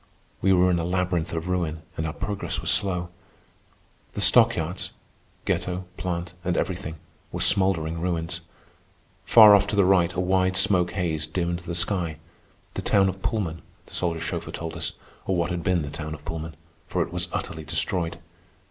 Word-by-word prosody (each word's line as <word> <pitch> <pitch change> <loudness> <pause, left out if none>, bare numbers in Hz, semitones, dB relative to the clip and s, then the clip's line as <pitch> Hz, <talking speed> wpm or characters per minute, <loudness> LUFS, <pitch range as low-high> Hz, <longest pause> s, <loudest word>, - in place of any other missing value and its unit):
We 95 - +3
were 90 0 +4
in 85 - +1
a - - -1
labyrinth 90 -1 -1
of 80 +1 -3
ruin, 85 -3 -2
and 80 - -2
our 75 - -4
progress 100 +1 -3
was - - +1
slow. 90 -3 0 1.0
The - - -5
stockyards - - +4 0.6
(ghetto, 90 +1 -1
plant, 85 -1 -4
and 90 -2 0
everything) 90 -3 -2 0.4
were - - -4
smouldering 85 -5 +2
ruins. 85 -1 -2 0.8
Far 110 -3 +9
off 100 0 +5
to 100 - -2
the 100 -2 +4
right 90 -2 +4
a - - -3
wide 95 0 +2
smoke 95 -2 +3
haze 80 -4 -1
dimmed 85 +1 -2
the 85 0 -6
sky,—the 85 -3 -3
town 95 -1 +3
of 95 +1 -6
Pullman, 90 -9 -2 0.2
the - - -18
soldier 85 -2 0
chauffeur 80 - -4
told 80 -1 -5
us, 80 -3 -3 0.3
or 95 - +1
what 85 -1 0
had 85 -1 -2
been 85 -1 +1
the 70 - -6
town 75 0 -5
of 75 - -15
Pullman, 80 -1 -5 0.3
for 90 -1 0
it 85 - -9
was 90 0 -2
utterly 80 -4 -4
destroyed. 80 +2 -1
85 Hz, 175 wpm, -25 LUFS, 80-95 Hz, 1.0 s, Far